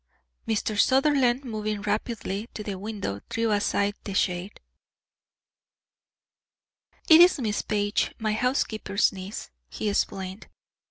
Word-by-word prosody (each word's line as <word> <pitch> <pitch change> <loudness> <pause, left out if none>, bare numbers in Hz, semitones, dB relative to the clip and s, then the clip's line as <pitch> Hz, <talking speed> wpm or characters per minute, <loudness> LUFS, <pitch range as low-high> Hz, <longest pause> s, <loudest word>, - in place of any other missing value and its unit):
Mr. 215 -1 -1
Sutherland, 265 -1 +3
moving 215 -3 -3
rapidly 210 0 -3
to 210 - -5
the 205 - -4
window, 200 - -4
drew 225 -1 0
aside 205 0 +1
the 200 - -5
shade. 180 +1 -1 2.5
"It 320 +1 +9
is 350 -3 +6
Miss 215 -4 -1
Page, 205 0 -1
my 215 -1 -1
housekeeper's 220 -4 +1
niece," 190 - -7 0.2
he 210 - -3
explained. 190 -1 -2
210 Hz, 110 wpm, -26 LUFS, 200-230 Hz, 2.5 s, It